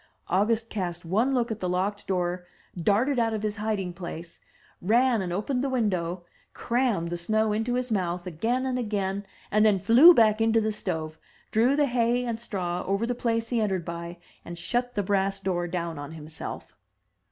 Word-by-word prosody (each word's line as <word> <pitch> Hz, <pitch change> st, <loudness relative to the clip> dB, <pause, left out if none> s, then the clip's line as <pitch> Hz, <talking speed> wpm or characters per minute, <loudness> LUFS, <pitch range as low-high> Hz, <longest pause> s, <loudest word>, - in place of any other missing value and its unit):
August 220 Hz, +5 st, +2 dB
cast 175 Hz, -4 st, -3 dB
one 215 Hz, +10 st, +1 dB
look 240 Hz, -2 st, 0 dB
at 220 Hz, -, -4 dB
the 180 Hz, -, -2 dB
locked 195 Hz, +3 st, -1 dB
door, 180 Hz, -1 st, -1 dB, 0.3 s
darted 215 Hz, -, +2 dB
out 225 Hz, -1 st, +1 dB
of 215 Hz, -, -4 dB
his 210 Hz, 0 st, -2 dB
hiding 210 Hz, -4 st, -2 dB
place, 170 Hz, -1 st, -8 dB, 0.4 s
ran 235 Hz, +4 st, +3 dB
and 180 Hz, -2 st, -3 dB
opened 250 Hz, +8 st, -1 dB
the 275 Hz, -, 0 dB
window,, 185 Hz, -8 st, -1 dB, 0.3 s
crammed 235 Hz, -8 st, 0 dB
the 175 Hz, -, -3 dB
snow 215 Hz, +4 st, +1 dB
into 225 Hz, +3 st, -1 dB
his 250 Hz, -1 st, -2 dB
mouth 180 Hz, -3 st, -1 dB
again 225 Hz, +10 st, -1 dB
and 255 Hz, -1 st, -1 dB
again, 200 Hz, -3 st, -2 dB, 0.3 s
and 215 Hz, +1 st, +4 dB
then 210 Hz, -2 st, +5 dB
flew 240 Hz, -, +8 dB
back 220 Hz, -7 st, +4 dB
into 225 Hz, 0 st, +4 dB
the 220 Hz, 0 st, 0 dB
stove, 160 Hz, -6 st, -4 dB, 0.3 s
drew 240 Hz, +5 st, +3 dB
the 295 Hz, 0 st, +3 dB
hay 245 Hz, -1 st, +1 dB
and 230 Hz, -2 st, -3 dB
straw 180 Hz, -6 st, -3 dB
over 200 Hz, +4 st, +1 dB
the 245 Hz, -, -1 dB
place 230 Hz, -1 st, -1 dB
he 235 Hz, -2 st, +1 dB
entered 190 Hz, -5 st, -1 dB
by, 170 Hz, 0 st, -6 dB, 0.3 s
and 170 Hz, 0 st, -8 dB
shut 245 Hz, +8 st, -2 dB
the 205 Hz, -, 0 dB
brass 195 Hz, 0 st, 0 dB
door 180 Hz, -3 st, -1 dB
down 170 Hz, -3 st, -3 dB
on 145 Hz, +2 st, -7 dB
himself. 155 Hz, 0 st, -8 dB
205 Hz, 185 wpm, -27 LUFS, 175-230 Hz, 0.4 s, flew